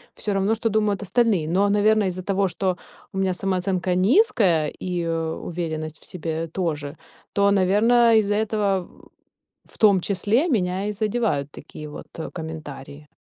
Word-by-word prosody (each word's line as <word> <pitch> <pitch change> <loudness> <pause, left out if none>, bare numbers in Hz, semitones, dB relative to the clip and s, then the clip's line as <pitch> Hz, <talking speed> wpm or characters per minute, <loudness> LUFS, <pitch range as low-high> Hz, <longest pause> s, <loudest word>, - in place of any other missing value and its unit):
всё 205 - -3
равно, 195 +3 +1
что 225 0 -1
думают 210 -1 0
остальные. 205 -6 +1
Но, 195 +4 +2
наверное, 210 0 +3
из-за 185 0 -4
того, 195 0 +1
что 185 +1 -2 0.4
у - - -6
меня 190 -1 +1
самооценка 185 -1 -1
низкая 195 - +3
и 175 -2 -2
уверенность 160 -1 -4
в - - -14
себе 165 -1 -4
тоже, 155 -4 -3 0.4
то, 200 0 +3
наверное, 220 +5 +4
из-за 205 -1 +2
этого 205 -3 0
в - - -21 0.7
в - - -15
том 200 -4 +5
числе 210 - +1
меня 190 - 0
и 210 - -2
задевают 205 -9 -1
такие 150 0 -10
вот, 150 - -9
э, 165 - -5
комментарии. 150 -3 -8
190 Hz, 155 wpm, -23 LUFS, 165-210 Hz, 0.7 s, том